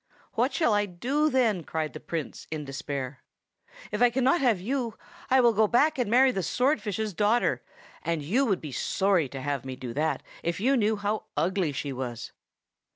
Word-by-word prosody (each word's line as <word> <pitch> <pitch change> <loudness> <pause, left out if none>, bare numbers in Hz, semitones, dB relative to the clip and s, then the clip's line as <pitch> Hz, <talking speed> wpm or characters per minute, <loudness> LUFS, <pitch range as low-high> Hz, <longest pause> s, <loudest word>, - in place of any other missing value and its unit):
"What - - +1
shall 315 -10 +2
I 205 0 +2
do, 270 - 0
then?" 230 - +2
cried 155 0 -3
the - - -7
Prince 165 -4 -5
in 155 -2 -4
despair. 135 -1 -5 0.7
"If 210 +2 -2
I 245 - +7
cannot 265 +6 +2
have 235 -8 +3
you, 235 +2 -2 0.3
I 265 - +5
will 235 -2 +5
go 215 0 +4
back 275 +6 +3
and 240 -4 0
marry 260 +3 +5
the 195 - -2
swordfish's 220 - 0
daughter, 210 +6 +2 0.4
and 165 -3 -2
you 220 - +2
would 195 -5 +1
be 150 - -6
sorry 185 +1 +1
to 135 - -6
have 140 -1 -2
me 130 -1 -6
do 125 -2 -6
that 155 +3 -1 0.2
if 170 +1 -2
you 260 +7 +3
knew 220 -3 +2
how 210 +1 -2
ugly 180 -2 +1
she 140 0 -4
was." 125 -2 -5
205 Hz, 190 wpm, -27 LUFS, 155-245 Hz, 0.7 s, I